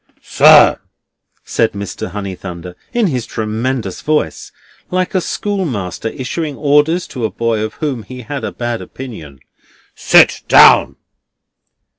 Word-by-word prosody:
"Sir," -, -, +6 dB, 0.6 s
said 115 Hz, -1 st, 0 dB
Mr. 100 Hz, -2 st, -6 dB
Honeythunder, 90 Hz, -3 st, -7 dB, 0.2 s
in 240 Hz, -3 st, +1 dB
his 130 Hz, -, -2 dB
tremendous 110 Hz, -1 st, -3 dB
voice, 155 Hz, 0 st, -2 dB, 0.4 s
like 185 Hz, 0 st, -1 dB
a 185 Hz, -, +1 dB
schoolmaster 125 Hz, -, -3 dB
issuing 145 Hz, +4 st, -4 dB
orders 150 Hz, +4 st, +2 dB
to 125 Hz, -, -6 dB
a 110 Hz, -, 0 dB
boy 115 Hz, +2 st, -2 dB
of 110 Hz, 0 st, -4 dB
whom 140 Hz, -6 st, -3 dB
he 125 Hz, +3 st, -10 dB
had 140 Hz, +4 st, -6 dB
a -, -, -3 dB
bad 120 Hz, -1 st, -4 dB
opinion, 80 Hz, -, -10 dB, 0.5 s
"sit -, -, +4 dB
down." -, -, +6 dB
120 Hz, 125 wpm, -16 LUFS, 105-150 Hz, 0.6 s, Sir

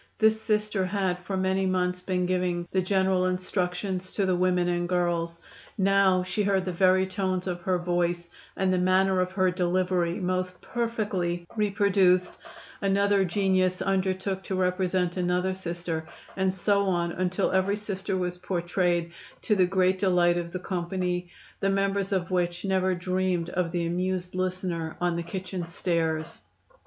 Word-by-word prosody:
This 220 Hz, 0 st, +3 dB
Sister 210 Hz, -2 st, 0 dB
had 185 Hz, -1 st, -1 dB
for 190 Hz, +2 st, -4 dB
many 190 Hz, 0 st, +1 dB
months 180 Hz, -1 st, 0 dB
been 180 Hz, -1 st, -1 dB
giving 180 Hz, -1 st, -1 dB
the 190 Hz, -, +2 dB
general 190 Hz, -1 st, +2 dB
instructions 185 Hz, 0 st, -2 dB
to 200 Hz, -, +1 dB
the 185 Hz, -1 st, +2 dB
women 180 Hz, 0 st, +2 dB
and 175 Hz, 0 st, -1 dB
girls; 170 Hz, -2 st, 0 dB, 0.4 s
now 195 Hz, -1 st, +4 dB
she 185 Hz, +3 st, -2 dB
heard 195 Hz, -2 st, +1 dB
the 185 Hz, -, -2 dB
very 185 Hz, +1 st, +4 dB
tones 185 Hz, -1 st, -2 dB
of 175 Hz, -2 st, -3 dB
her 185 Hz, +1 st, +1 dB
voice 175 Hz, 0 st, -1 dB, 0.3 s
and 185 Hz, -1 st, +2 dB
the 185 Hz, -, +2 dB
manner 185 Hz, +1 st, +3 dB
of 185 Hz, 0 st, -1 dB
her 185 Hz, -1 st, +2 dB
delivery 180 Hz, -1 st, 0 dB
most 185 Hz, 0 st, -2 dB
perfectly 205 Hz, -7 st, -2 dB
reproduced; 195 Hz, -3 st, +2 dB, 0.5 s
another 200 Hz, 0 st, +3 dB
genius 185 Hz, 0 st, +1 dB
undertook 190 Hz, 0 st, -1 dB
to 190 Hz, -, -2 dB
represent 180 Hz, -1 st, 0 dB
another 180 Hz, +1 st, +1 dB
Sister, 170 Hz, -3 st, -4 dB, 0.3 s
and 190 Hz, -1 st, +1 dB
so 200 Hz, +2 st, +1 dB
on 175 Hz, -2 st, 0 dB
until 185 Hz, +2 st, 0 dB
every 190 Hz, +2 st, +2 dB
Sister 195 Hz, -2 st, -3 dB
was 180 Hz, -1 st, -3 dB
portrayed, 175 Hz, -1 st, 0 dB, 0.3 s
to 210 Hz, -, +2 dB
the 185 Hz, -2 st, +4 dB
great 185 Hz, 0 st, +2 dB
delight 180 Hz, -3 st, +3 dB
of 170 Hz, 0 st, -5 dB
the 185 Hz, -, -3 dB
company, 180 Hz, -1 st, -2 dB, 0.3 s
the 195 Hz, -, +1 dB
members 195 Hz, 0 st, 0 dB
of 185 Hz, -2 st, -1 dB
which 175 Hz, 0 st, -1 dB
never 190 Hz, -1 st, +1 dB
dreamed 180 Hz, -1 st, -1 dB
of 175 Hz, -2 st, -1 dB
the 170 Hz, -1 st, -1 dB
amused 180 Hz, +1 st, -2 dB
listener 185 Hz, -3 st, -2 dB
on 175 Hz, -1 st, +1 dB
the 170 Hz, -, -1 dB
kitchen 185 Hz, +1 st, -5 dB
stairs. 165 Hz, -1 st, -2 dB
185 Hz, 155 wpm, -27 LUFS, 175-190 Hz, 0.5 s, now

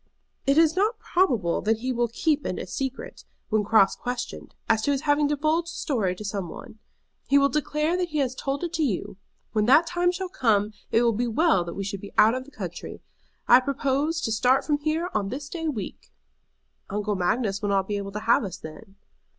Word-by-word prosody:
"It 275 Hz, +2 st, +4 dB
is 325 Hz, 0 st, +5 dB
not 425 Hz, +4 st, +1 dB
probable 245 Hz, -, +1 dB
that 220 Hz, +1 st, +1 dB
he 255 Hz, +1 st, -1 dB
will 240 Hz, 0 st, +1 dB
keep 290 Hz, +5 st, 0 dB
it -, -, -3 dB
a -, -, -4 dB
secret, 265 Hz, +7 st, -5 dB, 0.3 s
when 215 Hz, -1 st, +2 dB
cross 205 Hz, -2 st, +4 dB
questioned, 245 Hz, 0 st, -6 dB
as 220 Hz, -1 st, +3 dB
to 285 Hz, -, +1 dB
his 275 Hz, -1 st, 0 dB
having 290 Hz, 0 st, +2 dB
divulged 310 Hz, +4 st, 0 dB
the 335 Hz, -, -8 dB
story 210 Hz, -, -1 dB
to 210 Hz, -, -8 dB
some 195 Hz, -3 st, -3 dB
one. 215 Hz, -, -11 dB, 0.5 s
He 280 Hz, -, +4 dB
will 280 Hz, 0 st, +4 dB
declare 300 Hz, +3 st, 0 dB
that 360 Hz, -1 st, -1 dB
he 305 Hz, -, -3 dB
has 265 Hz, -3 st, +1 dB
told 275 Hz, +4 st, -3 dB
it 345 Hz, -1 st, -3 dB
to 330 Hz, -, -1 dB
you. 200 Hz, -7 st, -2 dB, 0.3 s
When 215 Hz, -1 st, +1 dB
that 295 Hz, +6 st, +6 dB
time 355 Hz, +1 st, +1 dB
shall 375 Hz, +1 st, -4 dB
come 220 Hz, -, +1 dB, 0.2 s
it 230 Hz, -, +4 dB
will 235 Hz, -1 st, +3 dB
be 240 Hz, +3 st, -1 dB
well 270 Hz, -, +3 dB
that 170 Hz, -, -6 dB
we 200 Hz, -, -3 dB
should 195 Hz, 0 st, -5 dB
be 200 Hz, -, -10 dB
out 220 Hz, +2 st, +6 dB
of 255 Hz, 0 st, -4 dB
the -, -, -14 dB
country. -, -, -7 dB, 0.4 s
I 245 Hz, -, +8 dB
propose 280 Hz, +4 st, -1 dB
to 225 Hz, -, -1 dB
start 250 Hz, +5 st, +3 dB
from 295 Hz, -2 st, +1 dB
here 315 Hz, +4 st, -1 dB
on 205 Hz, -2 st, -1 dB
this 280 Hz, +5 st, -5 dB
day 325 Hz, -1 st, -4 dB
week." 225 Hz, -11 st, -5 dB, 0.8 s
"Uncle 210 Hz, +1 st, -1 dB
Magnus 195 Hz, +2 st, 0 dB
will 205 Hz, -, -1 dB
not 195 Hz, -1 st, +1 dB
be 205 Hz, -, -2 dB
able 200 Hz, 0 st, -5 dB
to 210 Hz, -, -4 dB
have 230 Hz, +2 st, +3 dB
us 190 Hz, -3 st, -5 dB
then." 160 Hz, +4 st, -11 dB
255 Hz, 220 wpm, -25 LUFS, 210-300 Hz, 0.8 s, I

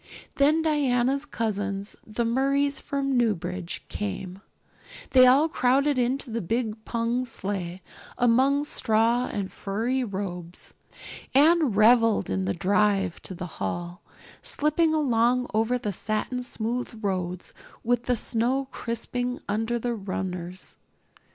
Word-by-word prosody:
Then 300 Hz, +3 st, +4 dB
Diana's 275 Hz, -3 st, +1 dB
cousins, 205 Hz, -6 st, -3 dB
the 225 Hz, +2 st, -2 dB
Murrays 275 Hz, +4 st, +1 dB
from 275 Hz, -1 st, -2 dB
Newbridge, 185 Hz, -6 st, -1 dB
came; 195 Hz, -2 st, -5 dB, 0.7 s
they 255 Hz, -1 st, +7 dB
all 275 Hz, +5 st, +5 dB
crowded 275 Hz, 0 st, +2 dB
into 250 Hz, +1 st, -1 dB
the 230 Hz, +1 st, -2 dB
big 220 Hz, +3 st, -2 dB
pung 235 Hz, +2 st, -1 dB
sleigh, 190 Hz, -6 st, -4 dB, 0.3 s
among 260 Hz, +4 st, +3 dB
straw 230 Hz, -2 st, +1 dB
and 195 Hz, -2 st, -3 dB
furry 230 Hz, +6 st, -2 dB
robes. 185 Hz, -5 st, -6 dB, 0.6 s
Anne 310 Hz, +1 st, +5 dB
reveled 225 Hz, -, +4 dB
in 95 Hz, 0 st, -1 dB
the 100 Hz, -, -1 dB
drive 195 Hz, -1 st, +1 dB
to 185 Hz, -, -6 dB
the 180 Hz, -, -5 dB, 0.2 s
hall, 175 Hz, -, -4 dB, 0.4 s
slipping 305 Hz, +2 st, +3 dB
along 250 Hz, -4 st, +2 dB
over 225 Hz, +3 st, +1 dB
the 210 Hz, -4 st, -3 dB
satin 215 Hz, +6 st, 0 dB
smooth 240 Hz, -1 st, -3 dB
roads 180 Hz, -2 st, -3 dB, 0.3 s
with 245 Hz, +1 st, 0 dB
the 250 Hz, -, +2 dB
snow 245 Hz, +4 st, 0 dB
crisping 245 Hz, +2 st, -3 dB
under 225 Hz, +3 st, -1 dB
the 240 Hz, +1 st, -2 dB
runners. 185 Hz, -3 st, -5 dB
230 Hz, 120 wpm, -26 LUFS, 200-255 Hz, 0.7 s, they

